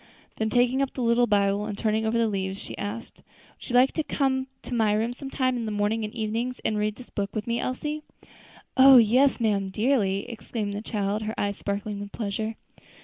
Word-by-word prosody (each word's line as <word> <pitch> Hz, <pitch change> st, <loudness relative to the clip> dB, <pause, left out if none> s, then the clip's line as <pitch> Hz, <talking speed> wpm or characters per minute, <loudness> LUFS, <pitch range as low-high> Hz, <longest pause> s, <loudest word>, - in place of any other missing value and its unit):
Then 220 Hz, 0 st, 0 dB
taking 250 Hz, +3 st, +2 dB
up 275 Hz, -, -2 dB
the 255 Hz, -, -2 dB
little 235 Hz, +1 st, +3 dB
Bible, 200 Hz, 0 st, +2 dB
and 205 Hz, -2 st, -5 dB
turning 220 Hz, 0 st, 0 dB
over 225 Hz, +1 st, +1 dB
the 230 Hz, -1 st, +3 dB
leaves, 195 Hz, -1 st, -2 dB
she -, -, -7 dB
asked, 205 Hz, +3 st, -6 dB, 0.4 s
"Would -, -, -10 dB
you 245 Hz, -, -1 dB
like 255 Hz, +2 st, +6 dB
to 315 Hz, -, -1 dB
come 265 Hz, -3 st, 0 dB, 0.2 s
to -, -, -6 dB
my 220 Hz, -3 st, +2 dB
room 225 Hz, +3 st, 0 dB
sometimes 260 Hz, -1 st, -1 dB
in 230 Hz, -2 st, -3 dB
the -, -, -2 dB
mornings 210 Hz, +2 st, 0 dB
and 215 Hz, +3 st, -8 dB
evenings, 230 Hz, +3 st, -2 dB
and 215 Hz, -, +1 dB
read 210 Hz, 0 st, 0 dB
this 255 Hz, -, -13 dB
book 200 Hz, +1 st, -3 dB
with 215 Hz, -1 st, -2 dB
me, 235 Hz, 0 st, -1 dB
Elsie?" 300 Hz, +4 st, -3 dB, 0.7 s
"Oh! 265 Hz, 0 st, +9 dB
yes, 250 Hz, +5 st, +4 dB
ma'am, 205 Hz, -4 st, +1 dB
dearly!" 205 Hz, -2 st, +1 dB
exclaimed 220 Hz, -3 st, -4 dB
the 205 Hz, -, -4 dB
child, 210 Hz, -1 st, -2 dB
her 220 Hz, +1 st, -4 dB
eyes 200 Hz, 0 st, -1 dB
sparkling 200 Hz, +1 st, -3 dB
with 205 Hz, 0 st, -7 dB
pleasure. 220 Hz, +1 st, -3 dB
220 Hz, 210 wpm, -26 LUFS, 205-245 Hz, 0.7 s, Oh